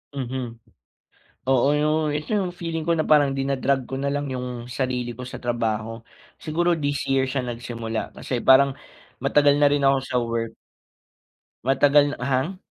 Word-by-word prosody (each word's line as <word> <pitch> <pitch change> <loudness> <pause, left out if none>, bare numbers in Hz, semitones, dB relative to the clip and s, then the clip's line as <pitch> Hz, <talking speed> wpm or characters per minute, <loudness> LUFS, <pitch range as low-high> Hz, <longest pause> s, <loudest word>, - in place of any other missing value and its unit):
Mhm, 125 -2 -4 1.0
oo 130 +2 +3
yung 150 0 +1
ito 150 +7 -5
yung 195 -3 +1
feeling 165 -2 -4
ko 170 - +3
na 155 - +1
parang 145 -3 +4
dina-drag 135 -1 0
ko 135 +2 -5
nalang 140 +1 -1
yung 125 0 -4 0.3
sarili 125 -2 -2
ko 125 +2 -8
sa - - -7
trabaho, 115 -2 -2 0.4
siguro 175 +3 +1
this 145 -3 -1
year 130 -1 +2
siya 130 -1 -2
nagsimula 115 -2 -5
kasi 125 -2 -3
parang 135 +1 +6 0.5
matagal 145 -1 +4
na 145 - +6
rin 145 -1 +1
ako 135 0 +4
sa 130 -1 -4
work. 115 -1 -2 1.1
Matagal 145 +2 +4
hang? 135 +8 -1
135 Hz, 150 wpm, -24 LUFS, 125-145 Hz, 1.1 s, parang